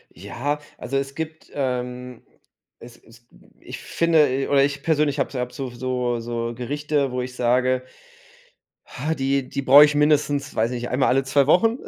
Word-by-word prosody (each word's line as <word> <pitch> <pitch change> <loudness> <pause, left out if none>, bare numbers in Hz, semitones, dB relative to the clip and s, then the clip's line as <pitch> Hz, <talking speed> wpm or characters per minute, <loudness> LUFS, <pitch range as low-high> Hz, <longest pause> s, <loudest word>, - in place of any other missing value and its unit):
Ja, 145 +4 -4 0.2
also 135 +2 -3
es 135 0 -3
gibt, 160 +1 -7
ähm, 125 -2 -4 0.6
es 120 0 -13
es 115 +1 -21 0.3
ich - - -9
finde 165 -3 +2
e 135 +1 -2
oder 140 -1 +4
ich 145 0 -1
persönlich 150 -3 +1
habe 140 - -2
habe 125 0 -4
so 135 -2 -5
so 125 -1 -2
so 115 0 -4
Gerichte, 145 +2 -2
wo 125 0 -2
ich 125 0 -7
sage: 125 +1 +1 1.0
„Ha, 155 +5 -3
die 135 -2 -1
die 140 - -4
brauche 140 +2 +8
ich 150 - -2
mindestens, 145 -1 +1
weiß 110 +2 +1
ich 120 -1 -4
nicht, 120 - -5
einmal 130 +1 +1
alle 135 +1 +2
2 135 +1 +2
Wochen“, 225 - +3
135 Hz, 175 wpm, -22 LUFS, 125-145 Hz, 1.0 s, brauche